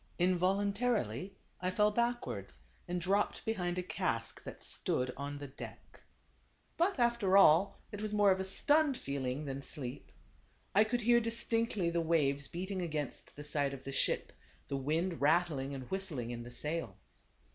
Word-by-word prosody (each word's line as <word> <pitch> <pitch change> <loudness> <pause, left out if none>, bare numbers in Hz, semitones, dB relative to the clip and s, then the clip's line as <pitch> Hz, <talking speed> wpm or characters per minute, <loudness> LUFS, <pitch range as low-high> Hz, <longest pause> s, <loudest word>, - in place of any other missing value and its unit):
Involuntarily 190 - +1 0.3
I 180 - 0
fell 210 +3 +3
backwards, 235 - -2 0.3
and 180 0 -1
dropped 195 +4 0
be 225 - +1
hind 180 -3 -2
a 180 - -1
cask 180 - -2
that - - -8
stood 125 0 0
on 145 +1 -5
the 145 - -6
deck. 135 0 -10 0.7
But, 355 +2 +2
after 235 -6 +3
all, 195 +1 +6
it 205 - -6
was 215 -1 -2
more 205 -1 +5
of 190 - +2
a - - 0
stunned 285 +8 +3
feeling 140 +1 -3
than 135 0 -4
sleep. 135 -1 -6 0.6
I 210 +3 +6
could 240 +2 -1
hear 235 +1 +5
distinctly 230 -5 0
the 170 0 +1
waves 140 -4 +2
beating 185 +2 -4
against 155 -5 -3
the 145 - -8
side 145 -2 0
of 135 - -12
the 135 - -5
ship, 135 - +1 0.4
the 140 - -1
wind 160 +6 -1
rattling 150 -3 +2
and 130 - -5
whist 190 0 -1
ling 120 -7 -4
in 120 -1 -5
the 120 - -8
sails. 125 - -5
175 Hz, 170 wpm, -34 LUFS, 140-205 Hz, 0.7 s, all